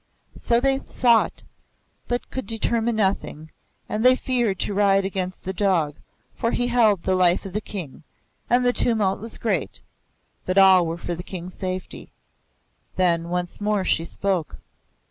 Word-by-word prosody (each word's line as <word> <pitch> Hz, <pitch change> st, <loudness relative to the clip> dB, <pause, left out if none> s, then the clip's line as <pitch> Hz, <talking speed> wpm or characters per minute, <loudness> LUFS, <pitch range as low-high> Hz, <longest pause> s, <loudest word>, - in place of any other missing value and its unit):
So 235 Hz, 0 st, +2 dB
they 270 Hz, +1 st, +2 dB
sought, 235 Hz, -3 st, +2 dB, 0.6 s
but 245 Hz, 0 st, -3 dB
could 260 Hz, -, -5 dB
determine 230 Hz, 0 st, 0 dB
nothing, 190 Hz, -6 st, -2 dB, 0.4 s
and 215 Hz, +1 st, -2 dB
they 255 Hz, 0 st, +6 dB
feared 240 Hz, -7 st, -1 dB
to 205 Hz, -, -2 dB
ride 195 Hz, -1 st, +3 dB
against 185 Hz, -1 st, -4 dB
the 190 Hz, -, -4 dB
dog, 175 Hz, -7 st, +1 dB, 0.4 s
for 230 Hz, -, -1 dB
he 245 Hz, -, 0 dB
held 220 Hz, -7 st, +3 dB
the 190 Hz, -, +1 dB
life 180 Hz, 0 st, +3 dB
of 190 Hz, -, -7 dB
the 210 Hz, -, -2 dB
King; 175 Hz, -12 st, -7 dB, 0.5 s
and 250 Hz, +1 st, +3 dB
the 245 Hz, -, +3 dB
tumult 215 Hz, -7 st, +1 dB
was 225 Hz, +1 st, -4 dB
great, 225 Hz, -, -2 dB, 0.6 s
but 185 Hz, +1 st, -2 dB
all 190 Hz, -3 st, +6 dB
were 165 Hz, +1 st, -3 dB
for 175 Hz, -, -4 dB
the 170 Hz, -, -5 dB
King's 180 Hz, -1 st, -8 dB
safety. 185 Hz, -1 st, -6 dB, 0.8 s
Then 170 Hz, -2 st, +1 dB
once 180 Hz, +2 st, -3 dB
more 205 Hz, -2 st, 0 dB
she 165 Hz, -, +1 dB
spoke. 180 Hz, -1 st, -2 dB
195 Hz, 160 wpm, -23 LUFS, 180-230 Hz, 0.8 s, they